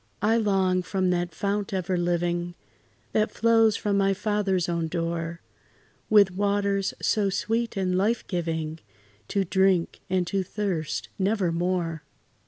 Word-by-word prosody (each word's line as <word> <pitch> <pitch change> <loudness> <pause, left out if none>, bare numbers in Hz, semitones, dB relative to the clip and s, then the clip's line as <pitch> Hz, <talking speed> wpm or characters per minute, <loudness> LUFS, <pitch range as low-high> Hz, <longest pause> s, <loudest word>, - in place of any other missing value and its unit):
I 220 +2 +4
long, 190 -4 +2
from 185 0 0
that 175 0 -1
fount 200 +1 -2
ever 185 0 -1
living, 175 0 -1 0.6
That 215 0 +2
flows 225 -2 +3
by 210 - -1
my 195 -1 +2
Father's 195 -4 0
own 170 -1 -1
door, 165 0 -3 0.7
With 205 -3 +6
waters 200 0 0
so 205 -2 +1
sweet 225 +3 -1
and 185 -1 0
life 215 +5 +1
giving, 160 -3 -3 0.5
To 200 - 0
drink, 190 -1 +2
and 185 -1 +1
to 195 +3 -1
thirst 185 -5 -3
never 195 -2 +1
more. 170 -2 -1
190 Hz, 135 wpm, -26 LUFS, 175-205 Hz, 0.7 s, With